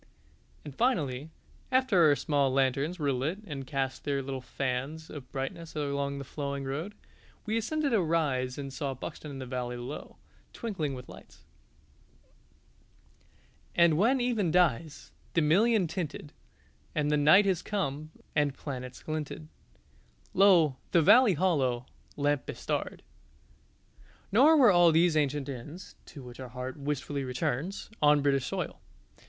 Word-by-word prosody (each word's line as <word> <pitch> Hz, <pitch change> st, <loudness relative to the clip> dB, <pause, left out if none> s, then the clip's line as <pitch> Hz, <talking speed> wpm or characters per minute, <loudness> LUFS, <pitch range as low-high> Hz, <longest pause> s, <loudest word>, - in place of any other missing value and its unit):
And 145 Hz, -, -7 dB
finally, 150 Hz, -, 0 dB, 0.4 s
after 255 Hz, -11 st, +4 dB
our 145 Hz, -, +5 dB
small 140 Hz, 0 st, +1 dB
lanterns 135 Hz, +5 st, +1 dB
were 145 Hz, -4 st, 0 dB
lit 135 Hz, +8 st, -1 dB
and 140 Hz, -6 st, -6 dB
cast 135 Hz, -1 st, -2 dB
their 140 Hz, -1 st, -1 dB
little 135 Hz, -1 st, -5 dB
fans 135 Hz, +5 st, -4 dB
of 140 Hz, -4 st, -9 dB
brightness 145 Hz, +5 st, -5 dB
along 140 Hz, -1 st, -2 dB
the 140 Hz, -, -5 dB
flowing 140 Hz, 0 st, -4 dB
road, 155 Hz, +10 st, -4 dB, 0.5 s
we 215 Hz, -, -1 dB
ascended 280 Hz, +5 st, 0 dB
a 215 Hz, -, +4 dB
rise 145 Hz, -7 st, 0 dB
and 135 Hz, -2 st, -6 dB
saw 135 Hz, -2 st, -3 dB
Buxton 150 Hz, +3 st, -8 dB
in 140 Hz, -, -7 dB
the 130 Hz, -, -6 dB
valley 125 Hz, -1 st, -4 dB
below, 120 Hz, +4 st, -7 dB, 0.4 s
twinkling 170 Hz, -, -3 dB
with 125 Hz, -, -9 dB
lights -, -, -14 dB, 2.3 s
"_And 170 Hz, -2 st, +6 dB
when 230 Hz, -, +3 dB
even 235 Hz, -7 st, +1 dB
dies, 160 Hz, -3 st, +1 dB, 0.2 s
the 165 Hz, -, +4 dB
million 205 Hz, +6 st, +4 dB
tinted, 160 Hz, -3 st, -5 dB, 0.6 s
And 150 Hz, -1 st, +1 dB
the -, -, +3 dB
night 155 Hz, +8 st, +6 dB
has 190 Hz, -4 st, +1 dB
come, 155 Hz, -7 st, -3 dB, 0.3 s
and 145 Hz, -3 st, +1 dB
planets 125 Hz, -3 st, -7 dB
glinted 150 Hz, -, -5 dB, 0.8 s
Lo, 175 Hz, -8 st, +5 dB, 0.2 s
the 170 Hz, -, +5 dB
valley 230 Hz, +2 st, +6 dB
hollow 135 Hz, -8 st, +1 dB, 0.3 s
Lamp 145 Hz, -1 st, 0 dB
bestarred!_" -, -, -3 dB, 1.3 s
Nor 285 Hz, +10 st, +6 dB
were 250 Hz, -7 st, +7 dB
all 175 Hz, -2 st, +6 dB
these 165 Hz, +1 st, +3 dB
ancient 145 Hz, -2 st, 0 dB
inns 145 Hz, +7 st, -8 dB
(to 140 Hz, -5 st, -11 dB
which 125 Hz, 0 st, -11 dB
our 130 Hz, -1 st, -7 dB
heart 125 Hz, +1 st, -6 dB
wistfully 145 Hz, -1 st, -3 dB
returns) 130 Hz, -, -3 dB
on 150 Hz, -1 st, +5 dB
British 135 Hz, -2 st, +1 dB
soil. -, -, -4 dB
145 Hz, 140 wpm, -29 LUFS, 135-175 Hz, 2.3 s, were